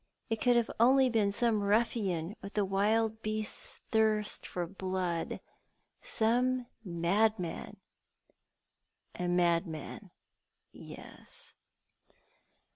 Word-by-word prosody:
It 225 - -1
could 240 -2 +4
only 265 +3 +6
have 255 -2 +1
been 210 -3 +3
some 220 0 +1
ruffian, 200 -4 0
with 200 +1 -9
the 205 -2 +2
Mild 215 +3 +1
beasts' 215 0 -4
thirst 215 -1 +1
for 175 -1 -3
blood 185 -2 -3 0.4
— - - -47
some 250 - +1 0.2
madman. 185 +1 0 0.7
" - - -14
A - - 0
madman, 170 -2 0 0.6
yes - - -11
210 Hz, 100 wpm, -31 LUFS, 180-225 Hz, 0.7 s, only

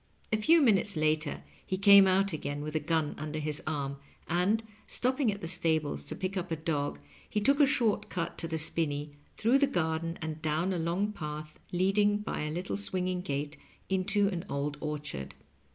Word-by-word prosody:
A - - +4
few 315 +9 +5
minutes 205 - +3
later 155 -1 0 0.2
he 185 - -2
came 200 0 +8
out 195 0 +2
again 145 -1 -3
with 150 +1 -5
a - - +3
gun 155 0 0
under 155 +1 -4
his 155 +1 -2
arm, 140 -3 -2 0.3
and, 185 +6 +1 0.2
stopping 255 -1 +1
at 200 - -7
the 165 - -4
stables 160 -4 0
to - - -4
pick 190 +1 -3
up 180 -1 -3
a 165 - 0
dog, 150 - -2 0.3
he 210 - 0
took 275 +7 +3
a 290 - +7
short 240 -7 +1
cut 170 -2 -3
to 165 - 0
the 160 -1 -2
spinney, 150 -2 -1 0.3
through 240 +5 +4
the 280 - +4
garden 165 -6 -1
and 160 -1 -5
down 160 +4 0
a 175 - -1
long 175 +6 0
path 150 -4 -7
reading 200 +3 +3
by 210 - -4
a 150 - -2
little 180 +5 -3
swinging 185 -2 0
gate 145 -2 -3 0.3
into 200 +2 +2
an 180 -4 -3
old 140 +1 -2
orchard. 150 - -4
170 Hz, 190 wpm, -30 LUFS, 155-200 Hz, 0.3 s, came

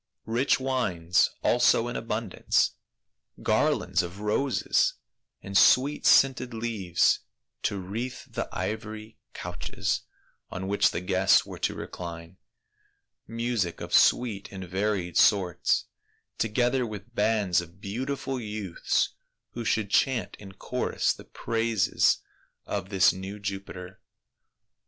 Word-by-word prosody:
Rich 120 +6 +2
wines 90 -10 +1
also 120 -1 +4
in 120 - -5
abundance, 110 -3 0 0.7
garlands - - +2
of 90 +3 -7
roses 105 +6 +1 0.5
and 100 0 -7
sweet 135 +9 +5
scented 130 -3 +4
leaves 110 -6 +1 0.4
to 100 - -1
wreathe 110 +7 -4
the - - -4
ivory 110 0 -5 0.2
couches 90 0 -3 0.5
on 95 +1 -5
which 100 +1 +3
the - - -3
guests 95 +1 +3
were - - -9
to - - -1
recline, 85 0 -8 0.9
music 115 -6 -2
of - - -7
sweet 105 -5 +3
and 95 -1 -7
varied 95 -2 -1
sorts, 95 -5 +3 0.5
together 120 +3 +1
with 110 0 -7
bands 105 -5 +2
of 85 +2 -13
beau 105 +6 -4
tiful 135 -1 -3
youths 105 -5 -1 0.4
who 120 - -5
should 105 -2 0
chant 130 -6 +1
in 95 -2 -11
chorus 125 +6 -1
the - - -13
praises 115 -3 +1 0.4
of 95 -2 -4
this 95 -2 +4
new 95 +2 -7
Jupiter. 95 -2 -6
105 Hz, 115 wpm, -27 LUFS, 95-115 Hz, 0.9 s, sweet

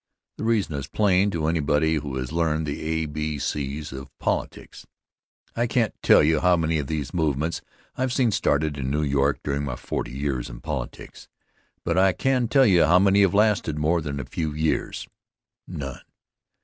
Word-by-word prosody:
The - - -3
reason 110 -8 +1
is 70 -1 -4
plain 100 +2 +2
to 85 -5 -2
anybody 80 -1 +1
who 70 -2 -4
has 65 -1 -4
learned 80 -1 0
the 70 -1 -4
a, 80 0 -1
b, 75 0 -3
c 70 0 -3
of 65 0 -8
politics. - - -4 0.7
I 120 +1 +1
can't 115 -2 +1
tell - - +6
just 75 0 +2
how 90 -1 +4
many 80 -1 0
of 70 - -4
these 75 -4 -3
movements 80 -1 -1 0.3
I've 130 0 -1
seen 125 -3 +2
started 75 -5 0
in 65 -1 -2
New 75 +2 0
York 70 0 +1
during 70 0 -2
my 70 -4 -3
forty - - -5
years 70 -3 -2
in - - -9
politics, 70 -4 -6 0.6
but 85 +1 +1
I 95 0 +4
can 130 +4 +1
tell 135 +2 +4
you 90 -6 +5
how 90 - +5
many 100 +1 +4
have 100 -1 +3
lasted 105 -7 +2
more 80 +3 +1
than 70 -2 -4
a 70 - -5
few 80 +2 -3
years 80 0 -1 0.6
none. 70 -3 -6
80 Hz, 185 wpm, -24 LUFS, 70-90 Hz, 0.7 s, tell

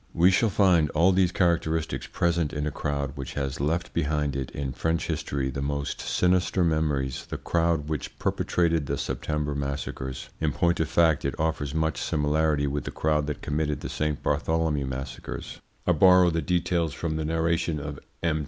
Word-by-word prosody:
We 90 +3 +6
shall 110 +4 +3
find 90 -6 +4
all 85 +4 +5
these 95 -1 +3
characteristics 80 -3 0
present 85 -3 0
in 75 -1 -2
a 75 - -1
crowd 70 -1 -2
which 70 -2 -6
has 70 -2 -2
left 80 +5 -1
behind 75 -3 0
it 65 -2 -3
in 70 -2 -4
French 80 +4 -1
history 70 -4 -2
the 70 - -4
most 70 0 -2
sinister 90 0 +2
memories 75 -5 0
the - - -4
crowd 85 -3 0
which 75 -3 -4
perpetrated 85 -4 +1
the - - -1
September 75 -1 -2
massacres. 70 -2 -4
In 75 -3 0
point 85 +4 +1
of 80 - 0
fact 80 -4 +3
it - - -3
offers 80 -2 -1
much 80 0 0
similarity 75 0 +1
with 70 -2 -2
the - - -3
crowd 75 -1 0
that 75 - -4
committed 75 0 -1
the - - -5
Saint 75 -1 -2
Bartholomew 80 -4 0
massacres. 65 0 -6 0.2
I - - +3
borrow 90 +1 +6
the 80 0 0
details 85 -4 0
from 80 -2 -2
the 80 - -2
narration 80 0 0
of 70 0 -6 0.2
M. 80 -2 +1
80 Hz, 180 wpm, -26 LUFS, 70-85 Hz, 0.2 s, We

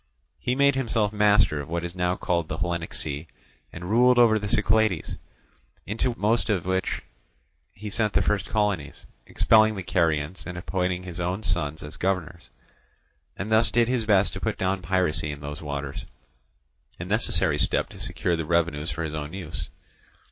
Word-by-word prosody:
He 125 - -1
made 140 +1 +4
himself 115 -5 0
master 105 -7 +3
of 70 - -10
what 85 +1 -2
is 85 0 -5
now 90 0 0
called 85 -3 -1
the 80 - -4
Hellenic 85 -1 -2
sea, 75 +1 -3 0.4
and 90 +1 -8
ruled 125 +4 +4
over 115 -3 +5
the 105 - -4
Cyclades, 110 -4 +1 0.7
into 115 +3 -1
most 110 +3 +1
of 95 -5 0
which 95 0 -1 0.7
he 105 0 -8
sent 105 -1 0
the - - +3
first 100 -3 0
colonies, 100 -9 -1 0.2
expelling 110 -1 +4
the 95 - -5
Carians 85 -2 0
and 90 -1 -6
appointing 90 0 -2
his 90 -1 -7
own 90 +4 -2
sons 80 -5 -1
governors; 90 -6 -2 0.9
and 100 +4 -4
thus 110 +1 +4
did 120 -1 +3
his 120 -3 0
best 100 -3 +3
to 95 - -5
put 110 -2 -1
down 95 0 -1
piracy 85 -4 0
in 70 - -7
those 75 +1 -7
waters, 70 -2 -5 0.9
a - - -4
necessary - - +2
step - - +1
to 100 - -12
secure 90 -2 -1
the 80 - -2
revenues 80 -1 0
for 80 - -3
his 80 -1 -4
own 75 +1 -5
use. 85 -4 -5
95 Hz, 170 wpm, -25 LUFS, 80-105 Hz, 0.9 s, over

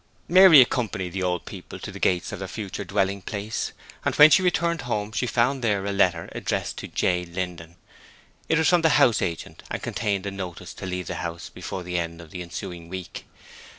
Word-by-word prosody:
Mary 180 -4 +9
accompanied 110 -7 0
the 95 - -3
old 90 -1 -1
people - - -9
to - - -7
the - - -9
gates 90 +1 +1
of 100 - -6
their 95 - -5
future 100 0 -5
dwelling 100 0 0
place, 105 +2 -4 0.3
and - - 0
when 150 +1 +9
she 150 - +6
returned 170 -3 +1
home 105 -4 -2
she 125 +2 -1
found 125 +3 +1
there 100 -4 +1
a 100 - -1
letter 90 -4 +2
addressed - - -2
to - - -6
J. 90 0 0
Linden. 85 -1 -6 0.7
It 160 - +3
was 160 - +3
from 175 -1 +4
the 160 -2 +4
house 125 -6 +4
agent 85 -2 -4
and - - -3
contained 100 -3 -1
a 100 - -3
notice 95 -3 -7
to 95 - -7
leave 90 -1 -3
the - - -4
house 85 -1 -5
before 95 - -6
the 90 0 -2
end 85 0 -4
of 85 -2 -12
the 90 - -6
ensuing 85 0 -7
week. 95 -1 -7
95 Hz, 210 wpm, -25 LUFS, 90-120 Hz, 0.7 s, Mary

